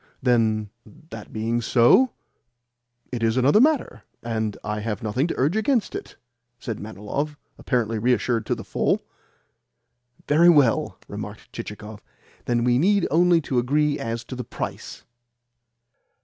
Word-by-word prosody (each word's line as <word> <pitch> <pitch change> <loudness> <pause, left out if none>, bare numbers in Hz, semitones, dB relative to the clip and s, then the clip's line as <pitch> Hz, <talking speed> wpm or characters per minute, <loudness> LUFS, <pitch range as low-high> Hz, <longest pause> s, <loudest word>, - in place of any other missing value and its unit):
"Then, 110 -4 +1 0.4
that - - -9
being 115 +2 -1
so, 120 - +5 1.0
it 125 -2 -4
is 115 +1 +1
another 140 - +5
matter, 300 0 +1 0.2
and 110 -3 -2
I 105 0 -3
have 110 +2 -4
nothing 125 +8 0
to - - -4
urge 145 +8 +1
against 220 0 +1
it," - - -7 0.4
said 115 -3 -5
Manilov, 110 +8 -4 0.2
apparently 115 -4 -1
reassured 120 -1 +1
to - - +1
the - - -8
full. - - 0 1.2
"Very 165 +4 +5
well," 140 -9 +3
remarked - - -8
Chichikov. 105 0 -8 0.4
"Then 120 -1 +1
we 120 0 +3
need 200 +3 +3
only 170 +1 +4
to 130 -4 0
agree 145 +4 +1
as 115 +1 -4
to 130 - -8
the 125 - -5
price." - - -7
120 Hz, 135 wpm, -24 LUFS, 110-150 Hz, 1.2 s, so